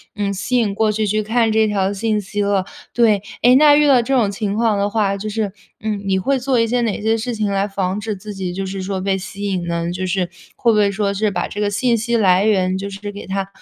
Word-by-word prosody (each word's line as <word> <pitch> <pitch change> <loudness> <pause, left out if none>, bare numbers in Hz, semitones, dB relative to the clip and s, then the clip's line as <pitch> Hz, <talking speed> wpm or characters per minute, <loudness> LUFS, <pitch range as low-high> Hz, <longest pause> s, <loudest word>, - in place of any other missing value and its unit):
嗯， 200 -1 -1
吸 205 +6 -1
引 210 -4 +1
过 215 0 +2
去 215 0 -1
去 215 +1 0
看 225 +1 +1
这 220 0 +3
条 195 -2 0
信 210 +1 -1
息 205 +1 -3
了。 200 -2 +1 0.3
对， 215 -4 +3 0.2
哎， 250 +2 +6
那 290 +1 +7
遇 295 0 +4
到 260 -3 +6
这 270 +3 0
种 220 -5 +3
情 200 0 -3
况 220 -2 +1
的 200 0 +1
话， 205 -2 0
就 215 +2 -5
是， 210 -2 -2 0.3
嗯， 210 -2 -3
你 190 -1 +1
会 270 +8 +1
做 255 -1 +1
一 230 - +2
些 245 +1 0
哪 220 -3 -1
些 225 +1 +1
事 235 +2 -3
情 215 -1 -1
来 195 +1 0
防 195 0 -2
止 215 -1 -3
自 205 +1 -9
己 185 -2 -4
就 195 +1 -3
是 190 0 -5
说 190 -1 -3
被 195 0 0
吸 200 +2 -7
引 185 -3 -2
呢？ 170 0 -2
就 185 +1 -3
是 180 -1 -1 0.3
会 235 - +2
不 215 - +2
会 205 -1 +3
说 200 0 -1
是 205 +1 0
把 180 - -2
这 205 - -7
个 205 -1 0
信 235 +4 +1
息 235 +2 -1
来 195 -2 +4
源 190 -3 +2
就 200 +1 -5
是 205 +1 -6
给 205 - -9
它 195 0 -3
205 Hz, 285 characters per minute, -19 LUFS, 195-220 Hz, 0.3 s, 那